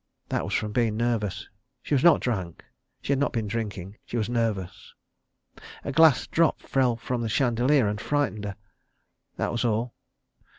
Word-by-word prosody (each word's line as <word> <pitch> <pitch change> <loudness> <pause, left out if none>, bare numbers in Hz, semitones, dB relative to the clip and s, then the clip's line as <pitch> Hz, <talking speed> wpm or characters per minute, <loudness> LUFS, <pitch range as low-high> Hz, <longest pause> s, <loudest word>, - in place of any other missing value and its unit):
That - - -1
was - - -2
from 105 -1 -1
being 110 -1 +1
nervous. 110 -4 -1 0.4
She - - -3
was 135 - +3
not 170 - +6
drunk. 95 -9 -3 0.4
She - - -2
had 140 - +2
not 145 - +1
been 115 -2 -1
drinking. 105 -2 -4
She 120 - -5
was 110 0 -1
nervous. 110 -6 -2 0.9
A - - -3
glass 155 -1 +5
drop 165 -1 +2
fell 130 -3 +1
from 120 +1 -3
the 115 - -2
chandelier 125 +2 +2
and 105 +1 -2
frightened 140 -8 -1
her. 100 -1 -5 0.8
That - - -1
was 120 - -1
all. 115 +1 0
115 Hz, 170 wpm, -26 LUFS, 105-130 Hz, 0.9 s, not